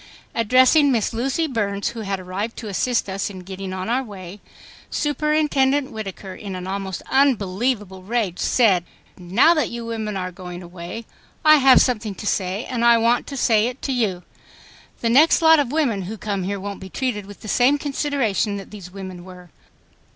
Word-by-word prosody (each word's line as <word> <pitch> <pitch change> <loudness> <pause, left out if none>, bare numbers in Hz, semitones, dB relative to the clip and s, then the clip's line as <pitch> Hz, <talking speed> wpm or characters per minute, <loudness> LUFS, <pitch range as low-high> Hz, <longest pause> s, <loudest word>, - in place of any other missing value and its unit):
Addressing 255 +6 +4
Miss 230 -2 0
Lucy 265 +8 0
Burns, 205 -7 -1
who 235 - -8
had 195 -2 -3
arrived 190 +5 -5
to 225 - -6
assist 230 +4 0
us 195 +1 -3
in 190 -2 -9
getting 190 +1 -7
on 185 0 -4
our 245 +3 +1
way, 200 -5 -9 0.5
Superintendent 295 -2 +1
Whittaker, 195 -3 -7
in 195 -2 -7
an 180 0 -6
almost 190 -1 -4
unbelievable 210 -6 +1
rage, 200 -3 -2
said, 200 -8 +3 0.3
"Now 195 - +4
that 305 -7 0
you 235 0 -6
women 220 -3 -3
are 185 -1 -4
going 180 0 -9
away, 175 +6 -8 0.4
I 310 0 +8
have 265 -2 +7
something 220 -5 -2
to 210 - -8
say 195 +1 -1
and 240 -2 -2
I 235 0 +6
want 235 +2 +2
to 275 - -6
say 225 -3 +3
it 250 +2 -6
to 275 - -1
you. 205 -8 -1 0.8
The 230 - +1
next 295 +7 +6
lot 320 -1 +6
of 270 -4 0
women 275 -10 +1
who 205 +5 -6
come 200 -2 -3
here 200 +1 -3
won't 200 +1 -6
be 190 - -9
treated 210 -4 -3
with 205 - -12
the - - -9
same 250 +6 +3
consideration 275 -8 -1
that 195 - -10
these 195 -4 -9
women 185 -2 -8
were." 180 -2 -13
215 Hz, 185 wpm, -22 LUFS, 190-255 Hz, 0.8 s, I